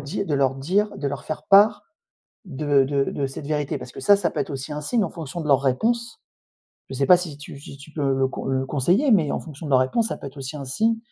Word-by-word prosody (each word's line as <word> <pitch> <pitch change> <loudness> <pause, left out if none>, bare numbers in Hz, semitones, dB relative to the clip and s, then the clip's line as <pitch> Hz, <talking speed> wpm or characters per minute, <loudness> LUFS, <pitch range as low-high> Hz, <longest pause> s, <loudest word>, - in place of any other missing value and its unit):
dire 155 +8 -4
de 150 - 0
leur 135 -1 +2
dire 195 +10 0
de 145 - -3
leur 140 0 -6
faire 155 -1 -5
part 205 +3 +5 0.6
de 145 -5 +1
de 140 0 0
de 140 - -2
cette 140 +2 -8
vérité? 150 -1 -2
Parce 125 0 -10
que - - -9
ça, 205 - +5
ça 200 -3 -1
peut - - -3
être - - -3
aussi 140 +2 -5
un 150 - -4
signe 225 +10 0
en 170 - -4
fonction 165 0 -7
de 150 - -5
leurs 135 -1 +5
réponses. 230 - 0 0.7
Je 135 - -6
sais 135 - +1
pas, 180 +3 +7
si 165 -5 -6
tu 145 -1 -10
si 140 - -11
tu 140 +3 -14
peux 140 -3 0
le 135 0 +1
conse 130 - -6
le 130 0 0
conseiller, 175 - +2
mais 165 -9 +3
en - - -2
fonction 155 -1 -9
de - - -5
leurs 130 - +5
réponses, 220 - +1
ça - - -4
peut - - -8
être 140 - -13
aussi 135 +2 -6
un 140 - -7
signe 220 - +1
145 Hz, 275 wpm, -23 LUFS, 135-180 Hz, 0.7 s, pas